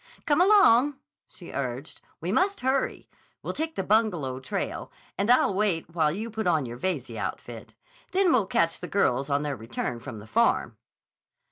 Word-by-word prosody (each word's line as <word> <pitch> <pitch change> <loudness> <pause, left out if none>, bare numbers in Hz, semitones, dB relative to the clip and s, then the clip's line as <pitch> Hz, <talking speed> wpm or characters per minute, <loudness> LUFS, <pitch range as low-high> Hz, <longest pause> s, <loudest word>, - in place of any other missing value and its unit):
"Come 300 +2 +3
along!" 295 - +5 0.3
she - - -11
urged. - - -5 0.2
"We - - -2
must 395 +1 +1
hurry. 260 +1 -1 0.4
We'll - - -3
take 320 +1 -3
the 195 - -2
Bungalow 180 - +1
trail, 130 - -4 0.2
and 200 +3 -1
I'll 245 -5 +4
wait 185 -5 0
while 155 -3 +2
you 220 +7 -5
put 220 -2 -3
on 160 -5 +2
your 120 0 -7
Veyze 145 -8 -2
outfit. 110 +3 -6 0.4
Then 375 -2 +3
we'll 225 -7 +2
catch 165 -2 +1
the 180 - -6
girls 140 -9 +1
on 140 +1 +1
their 145 -2 -2
return 115 +1 -4
from 125 -3 -8
the 105 - -10
Farm." 230 - +1
190 Hz, 170 wpm, -26 LUFS, -, 0.4 s, along